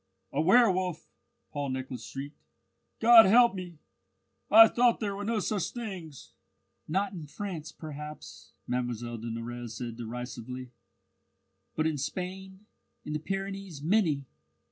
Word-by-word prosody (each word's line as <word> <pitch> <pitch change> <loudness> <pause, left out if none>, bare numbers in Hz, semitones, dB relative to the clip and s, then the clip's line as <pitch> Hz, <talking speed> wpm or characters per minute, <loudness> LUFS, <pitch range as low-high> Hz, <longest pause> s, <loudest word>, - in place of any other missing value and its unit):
"A 140 - +1
werwolf!" 185 -3 +3 0.4
Paul 145 -1 -3
Nicholas 130 -1 -5
shrieked. 140 +2 -8 0.6
"God 225 -2 +9
help 235 +3 +6
me! 180 -3 -7 0.7
I 225 +2 +10
thought 240 +1 +3
there 205 -3 -2
were 200 - -5
no 225 +2 0
such 205 -2 -1
things!" 185 - -7 0.5
"Not 195 +4 0
in 165 -5 -7
France, 170 -2 -6
perhaps," 150 -1 -9
Mlle 125 0 0 0.4
de 115 +1 -5
Nurrez 115 0 -6
said 115 -1 -6
derisively; 125 +1 -6 1.0
"but 155 - 0
in 155 -3 0
Spain, 190 +6 -5 0.4
in 150 - -4
the 150 - -1
Pyrenees, 195 -3 -5
many! 160 -6 +2
165 Hz, 125 wpm, -29 LUFS, 135-195 Hz, 1.0 s, I